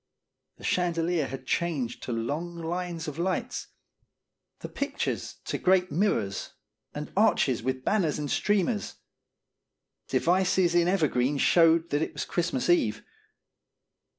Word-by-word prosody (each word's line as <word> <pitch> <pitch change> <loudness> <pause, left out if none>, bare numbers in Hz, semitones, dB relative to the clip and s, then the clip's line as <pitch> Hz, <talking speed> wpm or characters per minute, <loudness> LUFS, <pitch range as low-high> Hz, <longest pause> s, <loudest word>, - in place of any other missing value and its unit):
The - - -16
chandelier 170 -3 0
had 130 0 -7
changed 140 -7 -1
to - - -5
long 145 +10 -3
lines 170 0 -4
of 150 +1 -6
lights, 190 +8 -2 0.9
the - - -5
pictures 280 +1 -3
to - - -3
great 185 -1 +3
mirrors, 150 - 0 0.4
and 150 +1 -6
arches 195 - +3
with 130 +2 -2
banners 180 -8 +1
and 150 -2 -3
streamers. 205 +1 0 1.1
Devices 185 0 +2
in 175 0 +3
ever 180 -4 +3
green 130 +2 0
showed 165 +2 +4
that 145 - +1
it - - -2
was - - -3
Christmae 170 -7 -1
Eve. 110 -10 0
170 Hz, 125 wpm, -27 LUFS, 140-180 Hz, 1.1 s, showed